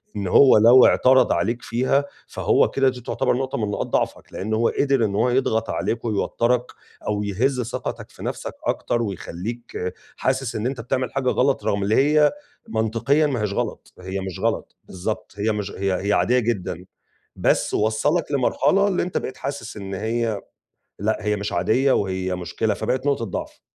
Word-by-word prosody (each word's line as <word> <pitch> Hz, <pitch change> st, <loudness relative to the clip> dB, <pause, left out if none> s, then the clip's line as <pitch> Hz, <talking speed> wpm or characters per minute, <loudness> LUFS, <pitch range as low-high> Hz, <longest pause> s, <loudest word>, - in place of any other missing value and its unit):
إن 100 Hz, -2 st, -2 dB
هو 130 Hz, +6 st, +7 dB
لو 120 Hz, +4 st, +8 dB
اعترض 130 Hz, +1 st, +5 dB
عليك 120 Hz, +1 st, 0 dB
فيها، 130 Hz, +4 st, +1 dB, 0.2 s
فهو -, -, +2 dB
كده 135 Hz, -1 st, +2 dB
دي 125 Hz, -1 st, -7 dB
تعتبر 120 Hz, -, 0 dB
نقطة 130 Hz, 0 st, -2 dB
من 105 Hz, -2 st, -1 dB
نقاط -, -, -2 dB
ضعفك، -, -, -2 dB
لإن 110 Hz, +3 st, -3 dB
هو 115 Hz, +1 st, +2 dB
قِدِر 135 Hz, -4 st, +2 dB
إن 100 Hz, -2 st, -2 dB
هو 125 Hz, -, +2 dB
يضغط 115 Hz, -3 st, +1 dB
عليك 115 Hz, +1 st, -2 dB
ويوتّرك 115 Hz, +3 st, +1 dB, 0.4 s
أو 105 Hz, -1 st, 0 dB
يهِز 125 Hz, +6 st, 0 dB
ثقتك 120 Hz, +1 st, -5 dB
في -, -, -12 dB
نَفسك -, -, -4 dB
أكتر 120 Hz, -, 0 dB
ويخلّيك 100 Hz, 0 st, -5 dB, 0.2 s
حاسِس 130 Hz, -2 st, -1 dB
إن 110 Hz, -, -2 dB
أنت 130 Hz, -2 st, -2 dB
بتعمل 130 Hz, +2 st, -2 dB
حاجة 135 Hz, -2 st, 0 dB
غلط 135 Hz, +2 st, +1 dB
رغم 100 Hz, 0 st, 0 dB
اللي 105 Hz, +3 st, +2 dB
هي 150 Hz, +2 st, +4 dB, 0.4 s
منطقيًا 115 Hz, -, +1 dB
ما 130 Hz, -6 st, -2 dB
هيش 105 Hz, -2 st, -1 dB
غلط، -, -, -4 dB
هي 95 Hz, +1 st, -4 dB
مش 95 Hz, -2 st, -6 dB
غلط، -, -, -1 dB
بالضبط. 95 Hz, +4 st, -5 dB
هي 105 Hz, +2 st, +1 dB
مش 105 Hz, -1 st, -3 dB
هي 95 Hz, 0 st, -1 dB
هي 105 Hz, -, +3 dB
عادية 125 Hz, +4 st, +3 dB
جدًا، 95 Hz, -6 st, -2 dB, 0.5 s
بس -, -, +1 dB
وصّلك 145 Hz, +10 st, +1 dB
لمرحلة 145 Hz, +8 st, +2 dB
اللي 185 Hz, -3 st, +1 dB
أنت 180 Hz, -, -3 dB
بقيت 130 Hz, -, -4 dB
حاسِس 140 Hz, -6 st, -5 dB
إن 100 Hz, -1 st, -6 dB
هي 110 Hz, +1 st, -1 dB, 0.6 s
لأ، 110 Hz, +3 st, 0 dB
هي 105 Hz, 0 st, 0 dB
مش 100 Hz, +1 st, -4 dB
عادية 115 Hz, +10 st, +2 dB
وهي 95 Hz, -2 st, -1 dB
مشكلة، 100 Hz, +4 st, -1 dB
فبقت 130 Hz, +6 st, -2 dB
نقطة 140 Hz, -5 st, +1 dB
ضعف. 100 Hz, -, -6 dB
115 Hz, 175 wpm, -23 LUFS, 105-130 Hz, 0.6 s, لو